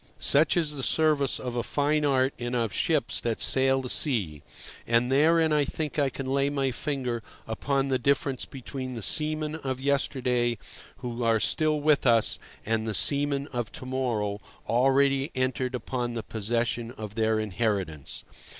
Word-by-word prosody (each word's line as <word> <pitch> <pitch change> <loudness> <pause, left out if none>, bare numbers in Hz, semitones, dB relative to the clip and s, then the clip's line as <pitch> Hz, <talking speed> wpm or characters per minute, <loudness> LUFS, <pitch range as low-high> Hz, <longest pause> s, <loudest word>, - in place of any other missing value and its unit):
Such 155 +5 +3
is 160 -3 +1
the 145 -2 -6
service 150 -1 +2
of 125 -1 -5
a 120 - 0
fine 150 +4 0
art 135 -1 +2
and 120 +1 -3
of 115 -4 -1
ships 155 -4 0
that 115 -2 -2
sail 135 0 +4
the 125 - -5
sea. 95 - +3 0.5
And 120 +2 +2
therein 160 +3 +3
I 150 -1 +3
think 150 +1 -3
I 140 -2 +2
can 135 +1 -6
lay 140 +1 +1
my 135 -2 -1
finger 125 -3 -3 0.2
upon 135 +5 -1
the 130 -1 +1
difference 135 0 0
between 130 -1 -7
the 115 - -5
seamen 155 +1 +1
of 130 -4 -4
yesterday, 125 -3 0 0.4
who 120 -1 -5
are 115 -1 +2
still 155 +5 +1
with 145 -2 +2
us, 115 -2 +3 0.3
and 110 0 -1
the 110 - -1
seamen 140 -1 +3
of 120 -3 -4
to - - -8
morrow, 115 -6 -2 0.3
already 135 +3 +2
entered 130 0 -1
upon 125 -1 -3
the 115 -2 -4
possession 115 +2 -2
of 110 -4 -8
their 110 0 +1
inheritance. 100 - -3
130 Hz, 165 wpm, -27 LUFS, 115-140 Hz, 0.5 s, sail